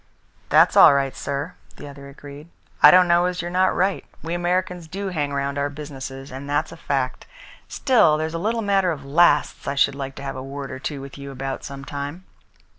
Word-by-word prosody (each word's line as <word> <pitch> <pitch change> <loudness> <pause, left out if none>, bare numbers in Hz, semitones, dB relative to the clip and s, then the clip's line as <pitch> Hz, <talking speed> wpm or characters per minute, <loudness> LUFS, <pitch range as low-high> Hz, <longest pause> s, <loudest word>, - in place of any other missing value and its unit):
"That's - - +5
all 140 - +8
right, 135 -2 -1
sir," 140 +5 -4 0.2
the 145 - -10
other 140 0 -11
agreed. 145 +3 -12 0.3
"I - - +10
don't 180 0 +6
know 175 +1 +3
as 180 0 -4
you're 175 0 -4
not 185 +1 +2
right. 190 +2 0 0.2
We 165 +1 -4
Americans 175 0 -1
do 195 +4 -5
hang 150 -5 -2
round 140 0 -2
our 140 0 0
businesses, 135 -2 -8
and 135 +2 -8
that's 145 +2 -1
a - - -9
fact. 135 -5 -3 0.4
Still, 220 - +3
there's 160 +1 -3
a 165 - -3
little 225 +3 -1
matter 195 -2 +2
of 145 -5 -4
lasts 150 +1 +2
I 140 - -1
should 140 - +3
like 135 -1 -6
to 140 - -9
have 135 -1 -5
a 130 - -6
word 135 +1 -7
or - - -7
two 140 0 -5
with 140 +1 -10
you 140 0 -8
about 135 0 -5
some 140 -1 -8
time." 145 +6 -6
145 Hz, 215 wpm, -22 LUFS, 140-175 Hz, 0.4 s, I